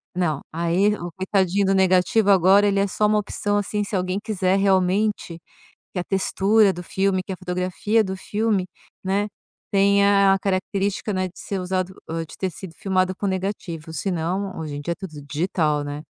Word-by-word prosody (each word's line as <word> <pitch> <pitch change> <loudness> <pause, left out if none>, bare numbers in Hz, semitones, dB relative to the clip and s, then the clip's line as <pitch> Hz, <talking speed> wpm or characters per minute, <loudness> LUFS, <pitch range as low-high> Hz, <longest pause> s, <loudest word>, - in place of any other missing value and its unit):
Não, 160 -6 0
aí 170 +5 +1
o 175 -3 -6
coitadinho 190 +1 +1
do 195 - +3
negativo 190 +3 +3
agora, 195 +2 +5
ele 200 -1 +2
é 200 - +2
só 210 +3 0
uma 210 0 +3
opção, 205 0 -1
assim, 205 +1 -1
se 205 - -4
alguém 185 +1 -1
quiser 190 -4 +1
realmente 195 -1 +1 0.5
que - - -4
a 180 - -2
textura 195 +2 +3
do 180 - -7
filme, 190 +1 0
que 190 - -6
a - - -5
fotografia 185 +4 0
do 190 -1 -3
filme, 205 -1 -1 0.4
né, 200 +2 0 0.4
tenha 200 0 +4
a - - 0
característica, 195 +2 -1
né, 185 0 0
de 180 - -17
ser 200 - -4
usado, 185 0 -2
hã, 165 +1 -3
de 165 - -13
ter 190 - -2
sido 170 +1 -10
filmado 185 +1 0
com 200 - -3
negativo. 185 -4 -4
Se 195 +4 -2
não, 185 +3 -2
hoje 155 -3 -5
em - - -5
dia 170 +4 -2
é - - -2
tudo 160 -6 -9
digital, 150 0 0
né. 145 +1 -5
190 Hz, 190 wpm, -23 LUFS, 180-200 Hz, 0.5 s, agora